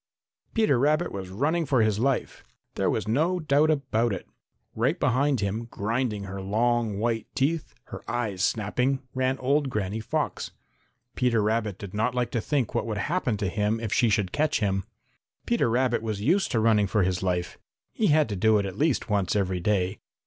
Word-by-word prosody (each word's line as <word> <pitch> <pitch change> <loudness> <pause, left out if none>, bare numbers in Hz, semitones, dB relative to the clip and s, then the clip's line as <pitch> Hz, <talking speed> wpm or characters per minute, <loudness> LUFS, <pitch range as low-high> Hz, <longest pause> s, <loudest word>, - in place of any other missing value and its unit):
Peter 215 - +3
Rabbit 150 +3 +2
was 95 -2 -6
running 145 - 0
for 130 -6 +2
his 105 -1 +1
life. 135 +2 -1 0.3
There - - 0
was - - -1
no 160 +11 +1
doubt 155 -1 +3
about 125 -7 +1
it. 95 - -6 0.5
Right 130 +10 0
behind 130 0 +2
him, 105 +4 -2
grinding 115 -1 -2
her 100 0 -6
long 110 +2 0
white 115 +1 -1
teeth, 150 +4 -1
her - - -8
eyes 110 -6 -2
snapping, 125 +6 0
ran 130 0 0
old 140 +2 +1
Granny 105 -2 -2
Fox. 110 - -2 0.7
Peter 120 -4 +2
Rabbit 105 -2 0
did 100 -2 -9
not 110 +4 0
like 125 -1 -1
to 115 - -1
think 135 -5 -1
what - - -1
would 110 -2 -2
happen 130 - -1
to 100 -2 -1
him 105 +4 0
if 115 -2 -3
she 120 - +3
should 95 -3 +1
catch 150 0 +1
him. 95 -3 0 0.6
Peter 235 - +1
Rabbit 120 -1 +1
was 110 -3 -3
used 175 - +2
to 115 - +1
running 110 -2 +3
for 105 0 +2
his 90 -1 0
life. 90 -2 -2 0.3
He 215 - +1
had 155 -1 +4
to 100 - -2
do 110 +3 +4
it 100 - 0
at 95 +1 -6
least 150 -3 +1
once 100 -4 0
every 95 -3 0
day. 95 +1 0
115 Hz, 190 wpm, -26 LUFS, 105-135 Hz, 0.7 s, had